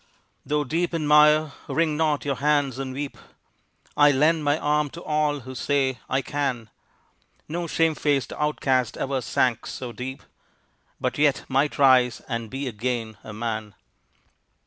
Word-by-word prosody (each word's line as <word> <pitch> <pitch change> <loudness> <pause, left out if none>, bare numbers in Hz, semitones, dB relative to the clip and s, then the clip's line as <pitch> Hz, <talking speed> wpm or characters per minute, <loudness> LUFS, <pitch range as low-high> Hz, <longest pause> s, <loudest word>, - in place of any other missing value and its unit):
Though 150 0 0
deep 165 +5 -1
in 160 -2 -1
mire, 150 0 +5 0.2
wring 155 +2 +1
not 150 -2 0
your 140 -2 -1
hands 145 -2 +1
and 135 -1 -4
weep; 140 +2 -5 0.8
I 145 0 +6
lend 155 +3 +3
my 145 +1 +2
arm 150 -1 +1
to 170 - -8
all 150 -2 0
who 130 +2 -9
say 130 -1 0
"I 130 +1 0
can!" 130 -6 -3 0.8
No 170 +2 -3
shame 165 -1 +2
faced 145 -3 0
outcast 135 -5 0
ever 135 -1 -1
sank 120 -2 0
so 125 -2 -6
deep, 130 +3 -7 0.8
But - - -2
yet 145 -2 +3
might 140 +3 +1
rise 130 -3 +5
and 115 -3 -4
be 135 +3 -4
again 115 -1 -3
a 110 - -8
man! 110 -2 -4
140 Hz, 150 wpm, -24 LUFS, 125-150 Hz, 0.8 s, I